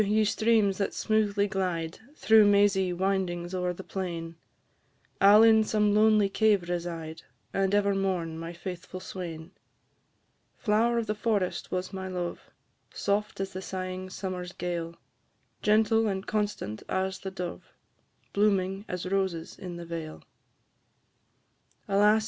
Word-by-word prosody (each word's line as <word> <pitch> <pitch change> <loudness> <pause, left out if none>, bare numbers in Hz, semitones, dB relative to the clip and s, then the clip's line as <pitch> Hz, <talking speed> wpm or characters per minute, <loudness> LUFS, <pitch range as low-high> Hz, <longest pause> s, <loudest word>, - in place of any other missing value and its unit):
ye 215 +1 +2
streams 210 -2 +2
that 200 - -1
smoothly 210 -2 +1
glide, 175 -4 -2 0.2
Through 220 -6 +6
mazy 200 -2 +4
windings 180 -1 -1
o'er 180 -1 0
the 180 +2 -8
plain; 170 -4 -5 0.9
I 200 +1 +8
'll 215 - +8
in 220 -1 +6
some 210 -1 +2
lonely 215 -1 +5
cave 200 -3 +2
reside, 170 -2 -4 0.3
And 195 +1 +1
ever 200 -1 +3
mourn 180 -4 -1
my 165 0 -5
faithful 180 +1 -7
swain. 175 -3 -7 1.1
Flower 230 +2 +2
of 230 - 0
the 210 - -1
forest 210 -4 -1
was 185 +1 -3
my 190 0 -4
love, 180 -2 -4 0.5
Soft 205 +1 -1
as 195 - -4
the 185 - -5
sighing 185 0 -5
summer's 185 -1 -5
gale, 170 -1 -4 0.7
Gentle 220 +1 +3
and 190 -1 -2
constant 205 - -2
as 190 0 -1
the 190 - -5
dove, 180 -2 -6 0.6
Blooming 195 -1 +1
as 180 0 -4
roses 185 -3 -1
in 180 -2 -6
the 170 - -7
vale. 165 -2 -6 1.6
Alas! 210 +2 +4
190 Hz, 135 wpm, -28 LUFS, 180-205 Hz, 1.6 s, I